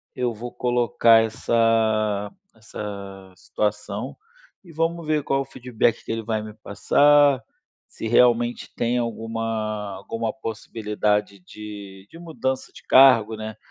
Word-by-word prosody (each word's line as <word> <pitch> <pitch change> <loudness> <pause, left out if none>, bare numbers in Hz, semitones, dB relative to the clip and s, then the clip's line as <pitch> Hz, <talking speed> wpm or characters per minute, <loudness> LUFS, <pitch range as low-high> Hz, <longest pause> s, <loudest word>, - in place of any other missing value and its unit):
eu 125 -2 -1
vou 120 +3 -7
colocar 120 -2 +3
essa 110 -2 +1 0.2
essa 100 -3 -8
situação 105 +2 -3 0.5
e 175 - -14
vamos 165 +1 -2
ver 155 -1 +1
qual 135 0 0
o - - -5
feedback 120 -3 -1
que - - -4
ele 115 0 -2
vai 110 -1 -2
me 110 0 -9
passar. 145 +6 +3 0.5
Se - - -8
realmente 120 +1 +2
tem 120 +1 0
alguma 115 -3 -3
alguma 115 +4 -4
possibilidade 105 -4 -2
de 100 0 -10
de 165 - -13
mudança 140 -6 -4
de - - -14
cargo, 115 -5 +5
né, 110 0 -6
115 Hz, 125 wpm, -23 LUFS, 105-125 Hz, 0.5 s, cargo